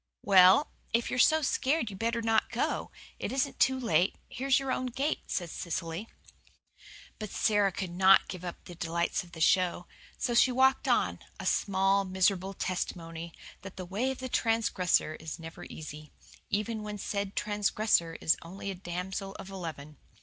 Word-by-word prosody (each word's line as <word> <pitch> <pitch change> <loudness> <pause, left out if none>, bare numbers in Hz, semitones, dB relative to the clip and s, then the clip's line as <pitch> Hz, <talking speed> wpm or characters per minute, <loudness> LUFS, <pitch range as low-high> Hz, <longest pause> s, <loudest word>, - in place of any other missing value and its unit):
"Well, 190 +7 +6 0.2
if 235 0 +1
you're 250 - -1
so 315 +4 +5
scared 265 -3 +1
you'd 190 - -9
better 230 0 -1
not 225 0 +2
go. - - -1 0.3
It - - -3
isn't 265 0 -1
too 260 +1 +3
late. 220 -6 +2
Here's 265 +2 +1
your 270 -1 -1
own 255 - -1
gate," 270 +5 -1
said 175 -3 -3
Cecily. 170 +4 -4 1.1
But 215 -1 -5
Sara 205 -1 +2
could 185 -1 -4
not 190 +2 +5
give 180 -1 -7
up 175 -1 -7
the 175 - -9
delights 170 +1 -1
of 175 - -17
the 160 - -9
show. 180 0 +3 0.3
So 240 - -1
she 255 +2 +5
walked 265 +1 +3
on, - - +2 0.2
a - - -6
small, 195 0 +2
miserable 190 0 +1
testimony 170 -2 -4 0.3
that 195 0 -10
the 185 - -5
way 205 +9 -1
of 265 - -3
the 260 - -5
transgressor 225 -9 +1
is 160 -1 -6
never 165 +1 -9
easy, 150 -1 -9 0.4
even 215 +2 -1
when 210 0 -5
said 200 0 -3
transgressor 210 -4 +1
is 160 - +3
only 195 +4 -6
a - - -4
damsel 190 +2 -5
of 195 - -9
eleven. 155 -6 -7
195 Hz, 170 wpm, -30 LUFS, 175-230 Hz, 1.1 s, Well